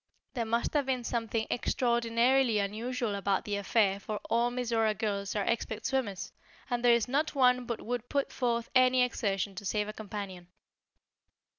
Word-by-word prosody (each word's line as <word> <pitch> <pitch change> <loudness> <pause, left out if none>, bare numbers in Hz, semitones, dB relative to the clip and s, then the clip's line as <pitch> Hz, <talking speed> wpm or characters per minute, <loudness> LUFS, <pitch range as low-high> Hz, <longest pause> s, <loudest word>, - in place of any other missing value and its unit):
There 235 -3 -1
must 230 +1 0
have 290 -3 +1
been 255 -2 0
something 230 -1 -1
extraordinarily 235 0 +2
unusual 220 +3 -2
about 200 -1 0
the 205 - -2
affair 200 -1 +2
for 210 +1 -4
all 235 +1 +3
Mizora 230 -3 0
girls 200 -2 -2
are 205 - 0
expert 225 -1 -2
swimmers, 235 -8 -2 0.4
and 240 0 0
there 240 -1 +6
is 235 0 0
not 290 +4 0
one 250 -2 +3
but 235 - -3
would 245 0 -4
put 280 -1 0
forth 235 -2 -1
any 255 0 +5
exertion 200 -5 -1
to 200 +2 -8
save 210 +1 -1
a 215 - -5
companion." 200 -4 -7
230 Hz, 165 wpm, -30 LUFS, 210-245 Hz, 0.4 s, there